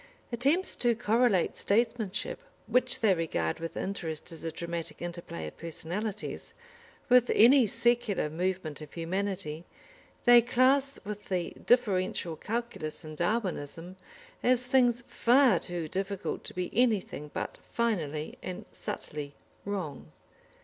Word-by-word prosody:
Attempts 280 +10 +2
to 240 -1 +2
correlate 220 -3 +2
statesmanship, 225 - 0 0.3
which 255 0 +2
they 215 -4 +5
regard 155 - -1
with 165 0 -5
interest 170 -6 -3
as 165 -1 -6
a 165 - -2
dramatic 170 -1 -5
interplay 170 - -6
of 75 - -8
personalities, 190 +6 -4 0.5
with 250 -1 +5
any 245 +1 +7
secular 235 -5 +1
movement 170 -1 -2
of 150 - -9
humanity, 180 -2 -3 0.6
they 240 -1 +9
class 265 +3 +3
with 210 0 -6
the 180 -3 -1 0.2
differential 185 -8 +2
calculus 220 -5 -4
and 155 0 -8
Darwinism, 175 -3 -2 0.5
as 250 0 +3
things 245 -2 +3
far 255 +2 +4
too 175 -3 -4
difficult 195 +3 -3
to - - -6
be 180 -1 -2
anything 210 - +1
but - - -4
finally 160 -10 -1
and 185 -1 -6
subtly 145 -1 -6 0.3
wrong. 160 - -4
195 Hz, 120 wpm, -30 LUFS, 165-240 Hz, 0.6 s, they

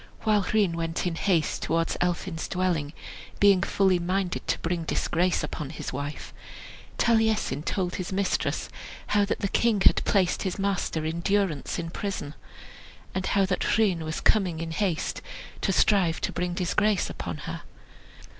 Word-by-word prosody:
While 215 -2 +3
Rhun 205 -5 +3
went 165 +1 -2
in 175 - 0
haste 165 -2 +1
towards 165 0 0
Elphin's 175 -1 -1
dwelling, 175 -5 -1 0.5
being 200 -2 +6
fully 190 0 +2
minded 185 +1 -1
to - - +1
bring 170 0 -2
disgrace 175 +2 0
upon 150 -3 -4
his 150 - -6
wife, 145 +3 -5 0.6
Taliesin 220 - +2
told 180 +2 -2
his 185 0 -4
mistress 195 0 0 0.5
how 205 -1 +4
that 200 - -2
the 200 - +1
king 225 +1 +2
had - - +5
placed 190 -4 +2
his 190 -3 -2
master 195 -5 -1
in 160 +2 -2
durance 190 -5 0
in 165 -1 -4
prison, 185 -8 -4 0.8
and 185 0 -2
how 195 -1 +3
that 185 +3 0
Rhun 200 -6 +3
was 155 +1 -4
coming 185 -7 +2
in 165 0 -4
haste 175 -2 -1 0.4
to 195 - +1
strive 185 -4 +3
to - - -1
bring 175 0 -2
disgrace 190 +3 +1
upon - - -5
her. - - -5
180 Hz, 155 wpm, -27 LUFS, 165-200 Hz, 0.8 s, being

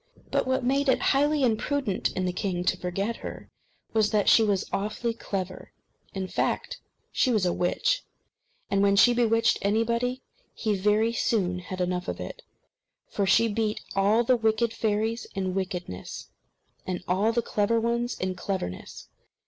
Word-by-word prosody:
But - - +1
what 260 0 +1
made 275 +3 +2
it 260 - +4
highly 290 +1 +2
imprudent 240 -2 0
in 185 - -1
the 180 - -1
king 180 -2 -2
to 185 - +2
forget 195 +5 -3
her - - -8 0.4
was 215 -2 +3
that 210 -2 +1
she - - +7
was 205 -3 +1
awfully 215 +4 -1
clever. 190 -4 -5 0.4
In 190 -1 -2
fact, - - -2 0.3
she 260 - +2
was 215 -5 +2
a 175 - +1
witch; - - +1 0.7
and 195 0 +2
when 200 0 +4
she 240 +4 +6
bewitched 230 -1 +2
anybody, 235 +5 0 0.3
he 215 -3 0
very 210 +4 +2
soon 185 -6 0
had 185 +1 -7
enough 180 0 -1
of - - -4
it; - - -7 0.7
for 200 -2 -1
she 230 +4 +5
beat 215 0 -1 0.2
all 205 +4 +3
the 255 +2 +4
wicked 225 0 +1
fairies 220 +2 -1
in 190 -1 -1
wickedness, 180 - -5 0.6
and 180 -1 -3
all 195 +5 +2
the 235 0 0
clever 215 +2 +1
ones 235 +1 -1
in 185 0 -1
cleverness. 180 - -5
215 Hz, 160 wpm, -27 LUFS, 185-235 Hz, 0.7 s, she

